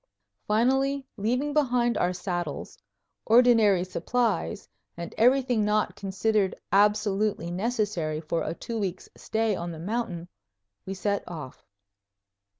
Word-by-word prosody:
Finally, 265 +5 +2
leaving 250 +7 -1
behind 250 -5 +2
our 180 - +1
saddles, 175 -4 -4 0.5
ordinary 225 -5 +5
supplies, 185 - -1 0.3
and 170 0 -6
everything 250 -1 +3
not 210 +1 +1
considered 195 +1 0 0.2
absolutely 205 -3 +2
necessary 190 -6 -1
for 165 +1 -2
a 160 - -3
two 230 +4 -5
weeks' 190 -3 -4
stay 220 -1 -1
on 170 -1 -4
the 165 - -7
mountain, 175 -2 -3 0.6
we 195 - -3
set 200 +1 -1
off. 150 -7 -9
210 Hz, 115 wpm, -27 LUFS, 180-235 Hz, 0.6 s, ordinary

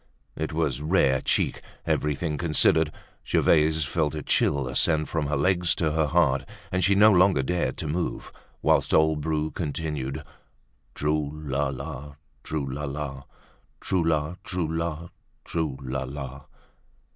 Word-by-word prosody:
It 80 0 -3
was 75 -5 -1
rare 75 -5 +3
cheek, - - 0 0.2
everything 75 +1 0
considered. 80 -1 +3 0.3
Gervaise 80 0 +3
felt 80 0 -1
a 75 - -4
chill 70 0 +2
ascend 75 +2 +2
from 80 -3 -1
her 75 -1 0
legs 90 +3 +2
to 80 -3 0
her 80 0 +1
heart, 70 -4 +2 0.3
and 90 0 0
she 100 +1 +4
no 105 +2 +7
longer 90 -6 +4
dared 85 +6 -1
to 80 - -4
move, 85 +4 -3 0.3
whilst - - +3
old 80 -1 +3
Bru 80 0 -1
continued: 75 -3 -3 0.7
"Trou 75 0 0
la 75 -2 -2
la, 70 +1 -6 0.3
trou 75 -3 -2
la 70 +3 -4
la, 70 -1 -5 0.5
Trou 95 -3 0
la, 80 +1 0
trou 90 -4 -2
la, 80 +1 -3 0.4
trou 80 -5 -2
la 65 +1 -3
la!" 70 0 -7
75 Hz, 145 wpm, -26 LUFS, 70-80 Hz, 0.7 s, no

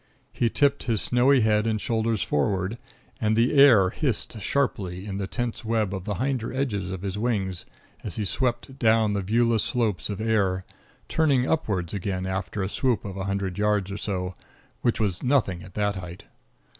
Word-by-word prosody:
He 120 - +1
tipped 140 +3 +2
his 115 -4 +1
snowy 125 +4 +3
head 105 0 +2
and 110 -1 0
shoulders 110 -1 0
forward, 95 +9 0 0.4
and 110 0 +2
the 115 +5 +3
air 120 -10 +7
hissed 120 -5 -2
sharply 95 -7 -1
in 100 -1 -4
the 95 - -2
tense 120 +2 -3
web 110 -3 0
of 95 -2 -5
the 105 -2 -2
hinder 130 -1 -1
edges 110 -9 -2
of 95 0 -5
his 100 0 -3
wings 100 -6 -1 0.4
as - - -3
he 105 - -2
swept 130 +4 -1
down 110 -2 +3
the 100 - 0
viewless 115 +2 +2
slopes 110 -7 -1
of 100 -1 -4
air, 100 -4 +1 0.4
turning 140 -5 +2
upwards 100 - -1
again 95 -1 -2
after 95 +1 -3
a - - -1
swoop 120 +2 0
of 100 -2 -5
a 95 -1 -4
hundred 100 -1 -2
yards 105 -2 +1
or 100 - -4
so, 95 -3 -3 0.5
which 120 - +1
was 100 -5 +1
as - - -13
nothing 125 -10 +1
at 90 +1 -13
that 105 -1 0
height. 90 -1 -8
105 Hz, 185 wpm, -25 LUFS, 95-120 Hz, 0.5 s, air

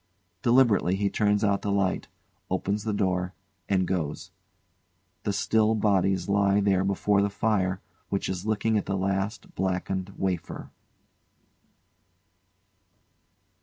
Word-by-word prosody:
] 90 0 -46
[Deliberately 120 -7 +4
he 100 0 0
turns 105 0 +2
out 100 -1 +2
the 105 - -3
light, 100 -2 0 0.4
opens 100 +3 -1
the 110 - 0
door, 90 -2 -1 0.3
and 95 -2 +2
goes.] 85 -5 -3 0.9
[The 105 - +1
still 110 +2 +2
bodies 95 -3 +1
lie 100 0 +3
there 100 -2 +2
before 100 +1 +2
the 100 - +1
fire 100 -3 0 0.3
which 100 - -1
is 90 -1 -3
licking 110 0 +1
at - - -7
the 95 - -1
last 95 +2 -2
blackened 95 0 -2
wafer. 95 -3 -3
100 Hz, 125 wpm, -27 LUFS, 95-105 Hz, 0.9 s, Deliberately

